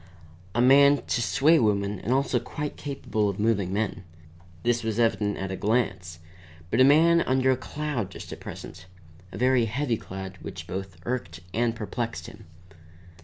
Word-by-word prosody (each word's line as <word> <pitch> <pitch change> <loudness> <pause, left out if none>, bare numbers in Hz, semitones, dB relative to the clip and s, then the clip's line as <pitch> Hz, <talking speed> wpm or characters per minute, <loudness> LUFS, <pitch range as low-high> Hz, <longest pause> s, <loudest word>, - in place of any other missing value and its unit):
A 120 - +3
man 140 +2 +6
to 120 - 0
sway 150 +8 +4
women 100 -2 +1
and 115 - -3
also 135 -1 +2
quite 145 +4 -5
capable 110 -7 -2
of 100 - -5
moving 100 -4 +1
men 100 -1 -2 0.6
(this 120 0 +1
was 110 -1 -2
evident 110 -3 +1
at 95 0 -4
a - - -2
glance); 95 -6 -1 0.5
but - - +3
a - - +9
man 165 +5 +6
under 130 -1 +2
a - - +3
cloud 145 -6 -4
just - - -9
at - - -9
present, 80 +2 -9 0.4
a - - -7
very 125 0 +3
heavy 120 +1 -1
cloud 95 -1 -8
which - - -7
both 95 -1 -6
irked 90 -9 -4
and 115 +1 +1
perplexed 115 +1 -4
him. - - -12
115 Hz, 170 wpm, -26 LUFS, 100-130 Hz, 0.6 s, a